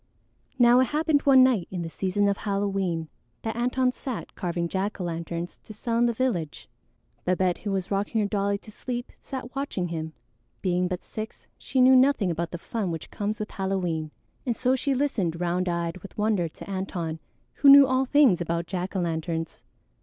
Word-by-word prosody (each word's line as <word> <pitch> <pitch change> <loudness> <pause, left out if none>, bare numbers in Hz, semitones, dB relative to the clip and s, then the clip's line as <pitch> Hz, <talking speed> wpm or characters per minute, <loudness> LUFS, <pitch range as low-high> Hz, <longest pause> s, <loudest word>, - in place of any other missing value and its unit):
Now 245 0 +6
it 260 - +5
happened 305 0 +2
one 265 -2 +8
night 240 -9 +3
in 180 -2 -4
the - - -4
season 190 +4 0
of 200 0 +1
Halloween 195 -5 -1 0.4
that 225 -1 -2
Antone 250 +2 +1
sat 255 -2 -6
carving 170 -2 -2
jack 195 +4 -2
o' - - -2
lanterns 170 0 -4
to 215 - -9
sell 230 +2 -1
in 240 - +4
the - - +2
village. 220 - -2 0.6
Babette, 180 0 +1
who 205 - -3
was 190 -1 -2
rocking 205 +3 0
her 210 - +1
dolly 200 0 0
to 215 - -14
sleep, 245 +3 -5
sat 260 -1 -7
watching 270 -11 -2
him. 160 -1 -4 0.5
Being 180 -1 +1
but 180 -1 -4
six, 220 0 -7
she 260 0 0
knew 260 +1 +7
nothing 255 -8 +4
about 170 0 -2
the 175 - -5
fun 205 +2 -3
which 165 -3 -6
comes 210 +1 -3
with 215 - -4
Halloween, 180 -5 -2 0.3
and 240 -3 -1
so 255 +2 +2
she 270 +1 0
listened 205 - 0
round 180 +1 0
eyed 170 0 -2
with 195 - -12
wonder 210 -5 +1
to 160 - -12
Antone, 180 -4 -3 0.4
who 280 - +6
knew 280 0 +10
all 260 0 +1
things 260 - +4
about 170 0 -1
jack 185 +2 -4
o' 190 - +1
lanterns. 165 -1 -3
195 Hz, 190 wpm, -26 LUFS, 175-245 Hz, 0.6 s, knew